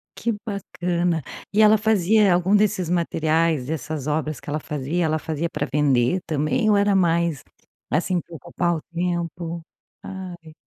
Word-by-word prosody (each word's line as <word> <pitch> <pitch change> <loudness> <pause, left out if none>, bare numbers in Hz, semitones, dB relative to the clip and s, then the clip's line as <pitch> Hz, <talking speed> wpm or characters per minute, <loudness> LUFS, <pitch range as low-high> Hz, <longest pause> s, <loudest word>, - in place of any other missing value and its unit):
Que 230 0 -1
bacana. 175 - -1 0.3
E 210 - +4
ela 215 0 +7
fazia 210 -1 +3
algum 180 +3 +3
desses 205 -4 +2
materiais, 165 -4 +1
dessas 155 -1 -4
obras 155 -1 -1
que - - -10
ela 150 +1 -1
fazia, 150 +3 -2
ela 155 0 +1
fazia 160 +2 -3
pra 150 -3 -2
vender 140 +2 +2
também 155 - 0
ou 210 - +5
era 200 0 +3
mais, 170 -5 +1 0.5
assim, 175 +4 +1
pra 170 0 -11
ocupar 170 +4 -1
o 160 - -5
tempo? 170 -1 -3 0.4
Ai. 175 -4 -8
170 Hz, 150 wpm, -23 LUFS, 155-185 Hz, 0.5 s, ela